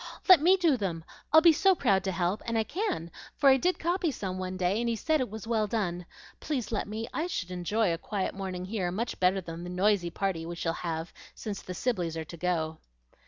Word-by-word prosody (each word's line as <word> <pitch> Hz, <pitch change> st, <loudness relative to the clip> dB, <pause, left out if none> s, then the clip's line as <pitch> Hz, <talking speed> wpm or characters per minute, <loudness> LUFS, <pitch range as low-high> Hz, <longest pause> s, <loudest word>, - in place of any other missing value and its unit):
"Let 370 Hz, -6 st, +9 dB
me 365 Hz, +4 st, +5 dB
do 330 Hz, -7 st, +3 dB
them! 175 Hz, -7 st, -3 dB, 0.3 s
I'd 315 Hz, +1 st, +7 dB
be 335 Hz, -2 st, +8 dB
so 380 Hz, +5 st, +4 dB
proud 200 Hz, -, +2 dB
to 190 Hz, -, 0 dB
help; 180 Hz, +3 st, -1 dB
and 230 Hz, -1 st, 0 dB
I 220 Hz, -, +2 dB
can, 215 Hz, -, -3 dB, 0.3 s
for 275 Hz, -, +5 dB
I 265 Hz, -, +6 dB
did 360 Hz, +7 st, +1 dB
copy 345 Hz, +1 st, 0 dB
some 190 Hz, -8 st, -4 dB
one 185 Hz, 0 st, -4 dB
day, 185 Hz, +3 st, +1 dB
and 235 Hz, 0 st, 0 dB
he 230 Hz, -, 0 dB
said 310 Hz, +7 st, +1 dB
it 255 Hz, -, -2 dB
was 220 Hz, +1 st, -7 dB
well 225 Hz, -2 st, +1 dB
done. 180 Hz, -5 st, -2 dB, 0.3 s
Please 265 Hz, -8 st, -3 dB
let 215 Hz, -, -1 dB
me; 220 Hz, +2 st, -4 dB
I 325 Hz, -, -1 dB
should 185 Hz, -, -4 dB
enjoy 180 Hz, +2 st, 0 dB
a 165 Hz, -, -4 dB
quiet 195 Hz, 0 st, -2 dB
morning 185 Hz, -2 st, -5 dB
here 190 Hz, -3 st, -2 dB
much 230 Hz, +6 st, -3 dB
better 185 Hz, +1 st, +3 dB
than 165 Hz, -1 st, -7 dB
the 175 Hz, -, -6 dB
noisy 185 Hz, 0 st, +2 dB
party 185 Hz, -2 st, -2 dB
we 170 Hz, +1 st, -5 dB
shall 165 Hz, -1 st, -1 dB
have, 165 Hz, -1 st, -4 dB, 0.2 s
since 205 Hz, -3 st, -5 dB
the 180 Hz, -, -7 dB
Sibleys 175 Hz, -10 st, -1 dB
are 160 Hz, -, -4 dB
to 170 Hz, -, -10 dB
go." 160 Hz, -2 st, -1 dB
195 Hz, 235 wpm, -29 LUFS, 175-235 Hz, 0.3 s, Let